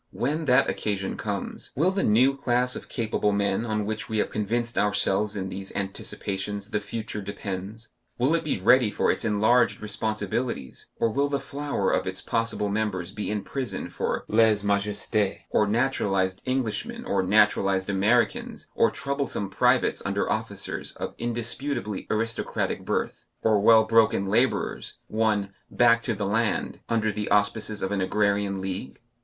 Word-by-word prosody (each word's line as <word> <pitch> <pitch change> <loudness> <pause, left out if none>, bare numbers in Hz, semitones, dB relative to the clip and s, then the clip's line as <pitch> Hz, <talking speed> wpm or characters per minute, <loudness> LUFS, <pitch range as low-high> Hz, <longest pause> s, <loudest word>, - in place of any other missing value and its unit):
When 150 +5 -2
that 125 -1 +4
occasion 100 -2 -2
comes, - - -4
will 165 +7 +3
the 195 0 -1
new 125 +6 +4
class 125 -1 +1
of - - -8
capable 110 -3 0
men 100 +2 0
on 110 -2 -1
which 110 0 -4
we 110 - -1
have - - 0
convinced 115 +3 -1
ourselves 100 0 +1
in 95 -2 -3
these 95 0 -6
anticipations 100 +1 -3
the 105 - +1
future 105 0 -5
depends 100 +2 -6 0.3
will 130 +6 +2
it 165 - +1
be 150 - -1
ready 125 +4 +5
for - - +1
its - - -2
enlarged 110 +3 +3
responsibilities, 105 - -3
or 115 - +1
will 140 +4 +1
the 140 -1 0
flower 140 +1 -2
of - - 0
its - - -3
possible 115 -2 -1
members 100 -4 -2
be 105 +1 -4
in 105 -2 -2
prison 135 -3 -4
for - - -2
lèse 110 -2 +3
majesté, 100 0 0
or 105 - +3
naturalized 100 -5 +1
Englishmen 135 - -2
or 240 - +1
naturalized 95 -1 +3
Americans 105 +3 +1
or - - +3
troublesome 140 -7 -3
privates - - +2
under - - -1
officers - - -3
of - - -5
indisputably 120 -1 -2
aristocratic 115 +1 -1
birth, - - -2 0.2
or 110 -2 +4
well 110 +1 +7
broken 110 -3 +3
labourers, 120 +6 0
won 105 -3 0 0.2
"back 115 -1 +4
to 115 -1 -2
the 100 0 -2
land," 110 +3 0
under 110 -1 +1
the 105 +1 -3
auspices 105 +1 +1
of 95 - -1
an 100 -2 0
Agrarian 100 0 +1
League? 95 -8 -5
105 Hz, 155 wpm, -26 LUFS, 100-120 Hz, 0.3 s, well